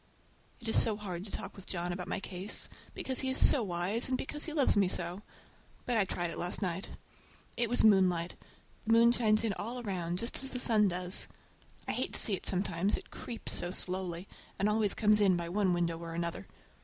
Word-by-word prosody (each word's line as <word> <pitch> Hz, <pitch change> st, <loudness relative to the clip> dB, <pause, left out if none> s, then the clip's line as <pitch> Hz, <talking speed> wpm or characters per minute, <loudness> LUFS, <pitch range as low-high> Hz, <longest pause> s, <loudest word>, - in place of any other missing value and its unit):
It 235 Hz, -, -9 dB
is 225 Hz, -, +7 dB
so 220 Hz, -3 st, +2 dB
hard 185 Hz, -3 st, -6 dB
to 205 Hz, -, -9 dB
talk -, -, -6 dB
with 195 Hz, -, -12 dB
John 175 Hz, -1 st, -3 dB
about 180 Hz, 0 st, -6 dB
my -, -, -2 dB
case, 190 Hz, +1 st, -3 dB, 0.3 s
because 260 Hz, -1 st, 0 dB
he 265 Hz, -, +1 dB
is 260 Hz, -, -1 dB
so 275 Hz, -, +7 dB
wise, 195 Hz, +5 st, 0 dB
and 255 Hz, -, +1 dB
because 295 Hz, +3 st, -2 dB
he 320 Hz, -, -4 dB
loves 295 Hz, -3 st, +2 dB
me 200 Hz, -2 st, +3 dB
so. 180 Hz, +1 st, -2 dB, 0.6 s
But 245 Hz, -, 0 dB
I 210 Hz, -3 st, +3 dB
tried 175 Hz, -2 st, -2 dB
it -, -, -7 dB
last 175 Hz, +1 st, -1 dB
night. 185 Hz, 0 st, -3 dB, 0.7 s
It 235 Hz, -1 st, 0 dB
was 245 Hz, -, +2 dB
moonlight. 185 Hz, -5 st, +3 dB, 0.5 s
The 225 Hz, -, +4 dB
moon 230 Hz, +1 st, +6 dB
shines 220 Hz, -3 st, +2 dB
in 220 Hz, -3 st, 0 dB
all 235 Hz, +4 st, -4 dB
around, 180 Hz, -6 st, -3 dB
just 235 Hz, +6 st, -1 dB
as 270 Hz, -, -5 dB
the 250 Hz, -, -5 dB
sun 220 Hz, -4 st, +3 dB
does. 180 Hz, 0 st, 0 dB, 0.6 s
I -, -, 0 dB
hate -, -, -2 dB
to -, -, 0 dB
see 210 Hz, -, +3 dB
it 190 Hz, -, -1 dB
sometimes, 190 Hz, 0 st, 0 dB
it -, -, -12 dB
creeps 235 Hz, -, -6 dB
so 175 Hz, -, +1 dB
slowly, 185 Hz, -1 st, -4 dB, 0.3 s
and 200 Hz, -, +1 dB
always 210 Hz, -1 st, +2 dB
comes 210 Hz, 0 st, +3 dB
in 190 Hz, -3 st, +4 dB
by 170 Hz, -1 st, -4 dB
one 195 Hz, 0 st, +1 dB
window 170 Hz, -1 st, 0 dB
or 165 Hz, -1 st, -7 dB
another. 170 Hz, 0 st, -3 dB
195 Hz, 215 wpm, -31 LUFS, 175-225 Hz, 0.7 s, is